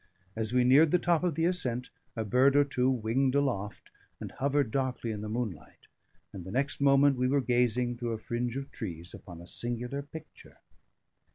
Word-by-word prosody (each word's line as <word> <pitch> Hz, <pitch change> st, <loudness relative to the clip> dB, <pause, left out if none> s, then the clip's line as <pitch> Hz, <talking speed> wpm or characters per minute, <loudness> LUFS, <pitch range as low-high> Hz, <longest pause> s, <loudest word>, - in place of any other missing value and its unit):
As 110 Hz, 0 st, -3 dB
we 125 Hz, 0 st, +3 dB
neared 140 Hz, +6 st, +6 dB
the 180 Hz, -, +4 dB
top 175 Hz, -1 st, +1 dB
of 175 Hz, -4 st, 0 dB
the 165 Hz, +1 st, +1 dB
ascent, 125 Hz, -9 st, -1 dB, 0.2 s
a 110 Hz, -2 st, -2 dB
bird 130 Hz, +6 st, +4 dB
or 145 Hz, -, +6 dB
two 130 Hz, -2 st, 0 dB
winged 130 Hz, +2 st, 0 dB
aloft 115 Hz, -8 st, -2 dB, 0.3 s
and -, -, -7 dB
hovered 140 Hz, -3 st, 0 dB
darkly 130 Hz, -3 st, -2 dB
in 105 Hz, -1 st, -5 dB
the 105 Hz, -, -5 dB
moonlight; 105 Hz, -10 st, -5 dB, 0.5 s
and 95 Hz, -, -7 dB
the 95 Hz, -, -9 dB
next 135 Hz, +7 st, -1 dB
moment 140 Hz, 0 st, +5 dB
we 125 Hz, 0 st, +1 dB
were 140 Hz, +2 st, +2 dB
gazing 120 Hz, -1 st, +1 dB
through 120 Hz, -1 st, -3 dB
a -, -, -3 dB
fringe 120 Hz, +2 st, -3 dB
of 135 Hz, 0 st, -6 dB
trees 85 Hz, -4 st, -7 dB
upon 85 Hz, -2 st, -11 dB
a 85 Hz, -, -11 dB
singular 120 Hz, +7 st, -4 dB
picture. 155 Hz, +2 st, -12 dB
125 Hz, 190 wpm, -29 LUFS, 115-140 Hz, 0.5 s, neared